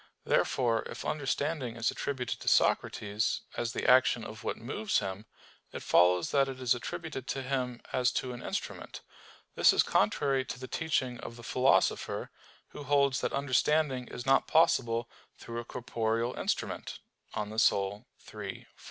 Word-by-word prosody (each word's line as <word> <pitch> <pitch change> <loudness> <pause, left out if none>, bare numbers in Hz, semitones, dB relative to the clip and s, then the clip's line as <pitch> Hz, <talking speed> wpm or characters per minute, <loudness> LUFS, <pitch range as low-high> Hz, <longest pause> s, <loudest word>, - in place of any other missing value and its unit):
Therefore 115 -3 +2
if - - -7
understanding 140 -3 -2
is 115 0 0
attributed 130 -4 -3
to - - -11
Socrates, 105 +2 +2
as 120 0 -2
the - - -2
action 125 -2 +5
of 110 +1 -9
what - - -2
moves 195 - -1
him, 95 +2 -4 0.4
it - - -7
follows 90 0 +4
that 135 -1 +3
it 130 -1 -7
is 125 -2 +3
attributed 135 +2 -5
to 135 - -3
him 125 -2 -2
as 125 -1 +2
to 125 -1 -2
an 120 - -8
instrument. - - -5 0.5
This - - +5
is - - +4
contrary 135 +5 +2
to 130 - -7
the 130 - -7
teaching 130 -5 -1
of 115 - -8
the 120 - -12
Philosopher, 130 +3 +1 0.4
who 145 - -9
holds 140 -1 +2
that - - -1
understanding 140 -1 +1
is 120 - -7
not 135 0 +3
possible 120 -8 +3 0.3
through 115 0 -6
a 120 - -6
corporeal 115 0 -2
instrument - - -3 0.4
(De - - -2
Anima 105 +1 -2
iii, 100 +1 -3
4). - - -8
125 Hz, 160 wpm, -30 LUFS, 115-135 Hz, 0.5 s, action